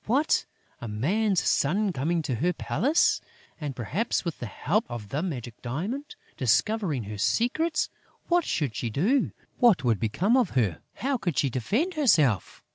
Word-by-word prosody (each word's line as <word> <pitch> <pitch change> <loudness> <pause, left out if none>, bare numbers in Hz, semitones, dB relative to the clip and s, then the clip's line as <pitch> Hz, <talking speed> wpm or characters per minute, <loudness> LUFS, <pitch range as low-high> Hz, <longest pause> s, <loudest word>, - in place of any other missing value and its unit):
What! 275 +8 +2 0.3
A 120 - -5
man's 185 - +1
son 190 +7 +2
coming 160 +4 0
to 140 - -2
her 170 +10 +1
palace! 260 - +2 0.4
And, 145 -4 -4
perhaps, 160 - -1
with 170 - -3
the 120 - -4
help 200 - 0
of 115 -4 -6
the 145 - -1
magic 125 - -5
diamond, 195 - -4 0.2
discovering 145 - +1
her 105 0 -7
secrets! 305 - +1 0.4
What 350 0 +3
should 140 - -1
she 120 - -2
do? 205 - +1 0.3
What 235 - +5
would 115 -5 +2
become 180 - +1
of 245 - +2
her? 100 -10 +1
How 270 +1 -1
could 175 - -2
she 140 - +2
defend 225 - 0
herself? 155 - +2
165 Hz, 160 wpm, -27 LUFS, -, 0.4 s, What